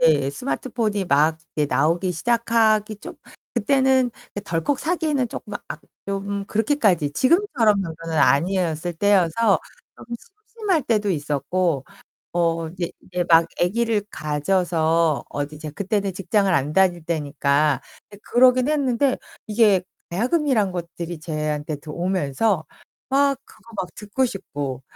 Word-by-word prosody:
네. 145 -4 +4
스마트폰이 225 - -2
막 155 +2 +3 0.2
이제 150 -1 +2
나오기 170 +6 +1
시작하기 220 +1 +2
좀 - - -9 0.4
그때는 260 +1 +3 0.3
이 - - -1
덜컥 170 - -1
사기에는 305 -6 0
쪼끔 210 -2 -7
아 - - -4 0.3
좀 200 0 -3
그렇게까지 215 - +2
지금처럼 255 - +3
정도는 165 -2 -5
아니었을 170 +2 +2
때여서 200 +3 +3 0.4
좀 - - -12 0.4
심심할 405 -9 0
때도 215 -5 +1
있었고. 150 0 -1 0.5
어 165 -1 0
이제 170 +1 -4
이제 180 -1 -3
막 165 -1 +6
아기를 220 +4 +1
가져서 160 0 +1
어디 145 +1 -4
이제 155 0 -7
그때는 200 +4 -1
직장을 195 +1 +1
안 145 -1 +1
다닐 180 -3 +3
때니까 145 -3 +1 0.3
네 205 - -13
그러긴 255 +1 +4
했는데 275 -3 +1 0.3
이게 210 -3 +4 0.3
가야금이란 240 - +1
것들이 170 -1 -6
저한테 155 -1 -3
들 150 +2 -11
오면서 180 +1 0 0.4
막 275 0 +3
그거 225 +1 -18
막 180 -2 -2
듣고 215 +5 -1
싶고 140 - -5
190 Hz, 285 characters per minute, -23 LUFS, 160-230 Hz, 0.5 s, 막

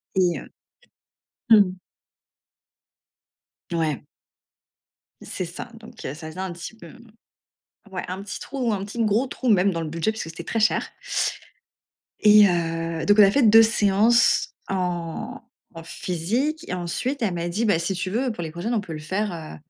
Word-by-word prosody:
et 180 -2 +2
heu - - -12 1.0
Mmh 220 - +9
mh. 185 -1 -1 1.9
Ouais. 160 -4 -1 1.2
C'est 185 - -4
ça. 185 +8 -8
Donc 225 0 -13
il - - -5
y - - -3
a - - -6
ça 155 +1 -8
faisait 160 - -10
un 190 -2 -3
petit 175 +6 -8
peu, - - -12
mmh 240 -2 -16 0.8
ouais, 185 - -4
un 185 +2 -5
petit 205 - -6
trou, 250 -5 -2
un 195 -1 -2
petit 230 +3 -2
gros 220 +5 +2
trou 255 -1 -3
même 195 -1 +4
dans 165 -1 -3
le 160 - -4
budget, 165 +7 0
puisque 220 -7 -6
c'était 165 +1 -8
très 225 - -1
cher 215 - +2 1.3
et 210 -1 +8
heu, 165 -1 -1
donc 205 +1 +4
on - - +10
a 195 - +7
fait 280 +5 +2
2 225 0 +8
séances 220 +1 +3
en 180 +6 -3 0.3
en 165 0 -9
physique 220 - -2
et 180 - -2
ensuite, 240 +10 -3
elle 205 -5 +1
m'a 170 0 -2
dit: 210 +7 -1
«Bah, 205 -7 +3
si 170 +4 -2
tu 185 +1 -3
veux, 245 +3 0
pour 175 - -6
les 160 - -4
prochaines, 175 +9 -3
on 215 - +1
peut 175 - -9
le 155 - -5
faire, 190 +6 -2
heu, 160 -2 -8
190 Hz, 185 wpm, -24 LUFS, 170-225 Hz, 1.9 s, on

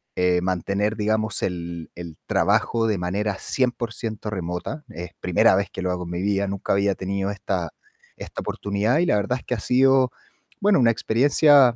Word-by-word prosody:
eh, 90 -1 +2
mantener, 100 +3 -1
digamos, 110 0 0
el 85 -2 -4
el 85 -3 -8
trabajo 115 -1 +2
de 105 -2 +1
manera 100 +3 -1
100% 115 -4 -2
remota. 95 - -4
Es 90 -4 -7
primera 95 +4 +4
vez 100 +1 0
que - - -6
lo 90 0 -1
hago 90 0 -3
en 85 - -7
mi 90 0 -3
vida. 100 0 0
Nunca 100 0 -2
había 100 0 +2
tenido 95 +1 -2
esta 95 -4 -3 0.5
esta - - -7
oportunidad 105 +8 0
y 175 - +3
la - - +3
verdad 105 +5 0
es - - -18
que 125 - -2
ha - - -5
sido, 130 +2 +4 0.5
bueno, 205 -1 +4
una 120 -2 +5
experiencia, 135 +2 +4
100 Hz, 180 wpm, -23 LUFS, 90-115 Hz, 0.5 s, una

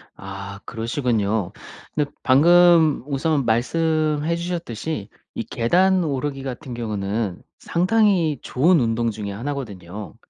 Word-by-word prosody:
아 100 0 -8
그러시군요. 115 -4 -1 0.4
근데 145 -1 0
방금 165 +1 +5
우선 145 -1 0
말씀해 155 +6 +1
주셨듯이 160 - -4 0.3
이 - - -2
계단 180 - +2
오르기 140 -2 -3
같은 130 0 -6
경우는 105 -3 -3 0.2
상당히 180 - +2
좋은 160 +6 +3
운동 115 -1 0
중에 100 -1 -5
1 125 +9 -4
거든요. 105 -6 -8
135 Hz, 245 characters per minute, -22 LUFS, 110-160 Hz, 0.4 s, 방금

